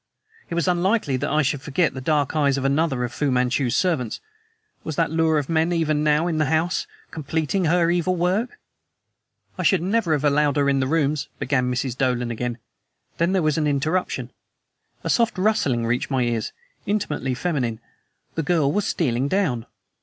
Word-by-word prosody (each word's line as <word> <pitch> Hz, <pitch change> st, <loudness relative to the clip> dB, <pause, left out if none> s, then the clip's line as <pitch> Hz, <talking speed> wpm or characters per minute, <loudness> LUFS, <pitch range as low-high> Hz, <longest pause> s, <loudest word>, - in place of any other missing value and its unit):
It 170 Hz, -, -3 dB
was 170 Hz, +2 st, 0 dB
unlikely 180 Hz, -, +1 dB
that 145 Hz, +3 st, -2 dB
I 150 Hz, +1 st, +2 dB
should 140 Hz, +1 st, -1 dB
forget 160 Hz, +1 st, 0 dB
the 130 Hz, -, -6 dB
dark 145 Hz, +1 st, 0 dB
eyes 140 Hz, -3 st, +2 dB
of 135 Hz, -, -2 dB
another 140 Hz, -2 st, +1 dB
of 120 Hz, 0 st, -4 dB
Fu 145 Hz, +2 st, 0 dB
Manchu's 125 Hz, -1 st, +1 dB
servants. 155 Hz, -, 0 dB, 0.6 s
Was 160 Hz, -, -4 dB
that 165 Hz, -1 st, +1 dB
lure 160 Hz, -1 st, +2 dB
of 145 Hz, -2 st, -1 dB
men 165 Hz, +1 st, +1 dB
even 155 Hz, -3 st, +1 dB
now 150 Hz, +2 st, +3 dB
in 165 Hz, -3 st, -1 dB
the 155 Hz, -, +3 dB
house, 160 Hz, +4 st, 0 dB, 0.2 s
completing 160 Hz, +4 st, -1 dB
her 170 Hz, +1 st, +3 dB
evil 180 Hz, +1 st, +1 dB
work? 190 Hz, -, 0 dB, 1.0 s
"I -, -, +1 dB
should 190 Hz, -5 st, +3 dB
never 195 Hz, -3 st, +1 dB
have 145 Hz, -1 st, 0 dB
allowed 145 Hz, 0 st, +2 dB
her 145 Hz, -1 st, +2 dB
in 135 Hz, -1 st, +2 dB
his 130 Hz, -, -1 dB
rooms 150 Hz, -2 st, 0 dB
" -, -, -41 dB
began 125 Hz, -2 st, 0 dB
Mrs. 125 Hz, 0 st, -2 dB
Dolan 125 Hz, -2 st, 0 dB
again. 120 Hz, +1 st, -3 dB, 0.6 s
Then 170 Hz, +3 st, +2 dB
there 185 Hz, -3 st, +2 dB
was 155 Hz, 0 st, +1 dB
an 150 Hz, -, +1 dB
interruption. 155 Hz, +6 st, -1 dB, 0.7 s
A -, -, -3 dB
soft 230 Hz, -3 st, +2 dB
rustling 180 Hz, -, +1 dB
reached 120 Hz, +2 st, -1 dB
my 130 Hz, -3 st, +1 dB
ears 115 Hz, -2 st, -1 dB, 0.4 s
intimately 150 Hz, -11 st, -1 dB
feminine. 125 Hz, -7 st, -2 dB, 0.5 s
The 165 Hz, -, -1 dB
girl 155 Hz, -3 st, +2 dB
was 205 Hz, +5 st, 0 dB
stealing 130 Hz, -5 st, 0 dB
down! 145 Hz, -, 0 dB
150 Hz, 185 wpm, -23 LUFS, 135-170 Hz, 1.0 s, now